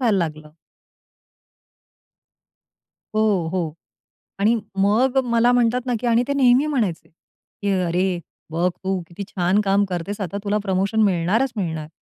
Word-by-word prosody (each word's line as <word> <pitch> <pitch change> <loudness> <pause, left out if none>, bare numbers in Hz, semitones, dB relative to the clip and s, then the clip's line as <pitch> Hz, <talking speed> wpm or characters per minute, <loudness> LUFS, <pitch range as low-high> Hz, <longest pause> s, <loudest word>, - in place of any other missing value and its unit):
व्हायला 225 -6 +2
लागलं. 155 -2 -4 2.6
हो, 205 -6 +2
हो. 165 -5 -1 0.7
आणि 215 +4 +3 0.2
मग 230 +7 +2
मला 235 +1 +3
म्हणतात 245 +1 +2
ना 250 - 0
की 245 - -3
आणि 235 +1 +3
ते - - +1
नेहमी 260 +1 +4
म्हणायचे, 225 - -1
की 200 +4 -9
"अरे 180 +1 0 0.3
बघ 170 +3 +1 0.2
तू 190 -1 0
किती 175 +4 -8
छान 185 +2 +1
काम 200 0 +2
करतेस 190 +3 -4
आता 195 +1 -3
तुला 210 +1 +1
प्रमोशन 195 +2 0
मिळणारच 200 +7 +1
मिळणार." 160 -5 -3
200 Hz, 135 wpm, -22 LUFS, 175-230 Hz, 2.6 s, नेहमी